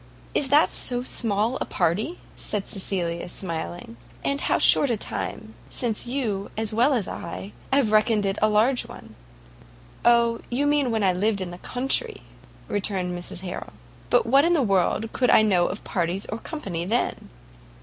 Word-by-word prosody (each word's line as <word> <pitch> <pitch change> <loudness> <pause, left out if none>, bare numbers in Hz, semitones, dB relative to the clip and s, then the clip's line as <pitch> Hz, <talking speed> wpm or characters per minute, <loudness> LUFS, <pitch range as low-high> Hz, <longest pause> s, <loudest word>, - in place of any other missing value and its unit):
"Is 285 - +2
that 290 +4 +5
so 245 0 0
small 225 0 0
a - - 0
party?" 215 - -1 0.2
said 205 -2 -2
Cecilia, 175 -3 -1
smiling; 160 - -6 0.3
"and 280 0 0
how - - +2
short 285 - +5
a 235 - +1
time 220 +1 -5 0.2
since 235 -3 -2
would - - -5
you, 215 -7 -2
as 220 0 -1
well 245 +6 +3
as 215 -6 0
I, 95 +3 -7 0.2
have 265 -5 +3
reckoned 215 -1 +3
it 195 +1 -1
a 215 - +4
large 230 +5 +2
one!" 110 - -12 0.9
"Oh, 235 -1 +4
you 260 +4 0
mean 290 -3 +2
when 220 -2 0
I 185 -2 +4
lived 200 +3 0
in 185 -2 -3
the 175 - -9
country," 270 - -1 0.4
returned 190 -3 -2
Mrs 175 0 -6
Harrel; 180 -1 -7 0.4
"but 245 - +3
what 270 +5 +5
in 340 +2 +3
the 305 -6 +3
world 195 +2 +1
could 250 - +1
I - - +6
know 185 -5 +3
of 200 - -6
parties 180 0 -2
or 215 - -5
company 195 - -5
then?" 225 +7 -1
215 Hz, 175 wpm, -24 LUFS, 185-245 Hz, 0.9 s, I